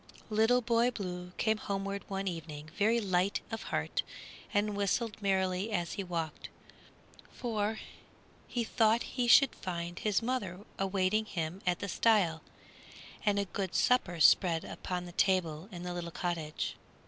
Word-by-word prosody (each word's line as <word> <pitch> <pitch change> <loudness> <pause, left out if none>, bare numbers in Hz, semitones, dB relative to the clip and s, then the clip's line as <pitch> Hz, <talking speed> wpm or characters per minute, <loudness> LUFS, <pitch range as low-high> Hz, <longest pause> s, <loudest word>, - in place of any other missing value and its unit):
Little 225 +4 +4
Boy 235 +1 +3
Blue 180 -6 -5
came 220 -1 +2
homeward 200 -1 -3
one 195 0 -3
evening 155 -3 -6
very 225 +3 +3
light 190 -2 +1
of 225 0 -3
heart - - -1 0.5
and 205 0 +1
whistled 210 +2 -1
merrily 190 +1 +1
as 175 -5 -1
he 200 - -3
walked, 165 -4 -4 0.8
for 220 -3 -2 0.7
he 240 - -1
thought 225 0 +3
he 250 -2 -2
should 275 +3 +7
find 175 -1 -5
his 210 0 +1
mother 205 -7 -2 0.2
awaiting 195 +2 +1
him 175 -1 -4
at 175 -1 +3
the 200 - -4
stile 190 -5 +3 0.9
and 205 -1 +4
a 200 - +1
good 190 -1 -4
supper 180 -9 +2
spread 165 +1 +5
upon 180 -1 -4
the 175 - -8
table 175 -2 +1
in 175 -2 -7
the 180 0 -3
little 175 -1 -4
cottage. 165 -3 -3
195 Hz, 150 wpm, -32 LUFS, 175-215 Hz, 0.9 s, should